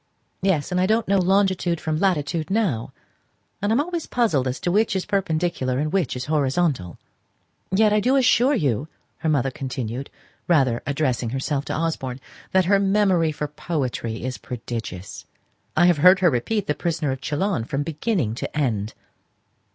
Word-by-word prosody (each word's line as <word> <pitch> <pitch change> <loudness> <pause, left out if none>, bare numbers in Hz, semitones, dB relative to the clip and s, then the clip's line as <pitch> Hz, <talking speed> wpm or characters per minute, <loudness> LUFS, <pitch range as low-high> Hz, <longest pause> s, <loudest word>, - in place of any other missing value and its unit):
"Yes; 185 -5 +1
and 180 0 +1
I 185 - +2
don't 220 +2 +1
know 200 0 +3
longitude 185 -2 +2
from 155 -1 -2
latitude 165 -4 0
now; 190 - 0 0.7
and 205 +2 0
I'm 230 - +3
always 335 +2 -2
puzzled 165 - +1
as 130 - -3
to 175 - 0
which 210 +2 +2
is 190 - -1
perpendicular 170 -9 -1
and 150 +2 -1
which 185 -10 0
is 125 0 -4
horizontal." 140 - 0 0.7
"Yet, 210 +2 +3
I 210 - +4
do 255 +6 +2
assure 265 +1 +4
you," 140 - 0 0.3
her 160 - -1
mother 135 -3 +1
continued, 130 -1 -5 0.4
rather 135 -8 +3
addressing 135 -5 0
herself 135 +3 -2
to - - -3
Osborne, 145 -6 -2 0.3
"that 190 -1 +3
her 200 +2 +4
memory 195 -5 +2
for 150 0 -4
poetry 130 -8 -3
is 130 0 -4
prodigious. 110 -6 -6 0.5
I 175 - +6
have 175 -3 +4
heard 185 +5 +6
her 175 -3 +5
repeat 195 - -1
the 150 - 0
'Prisoner 155 -3 -1
of 130 0 -5
Chillon' 155 - -1
from 140 +4 -2
beginning 155 - -1
to 125 - -5
end." 110 -7 -1
155 Hz, 165 wpm, -23 LUFS, 130-190 Hz, 0.7 s, I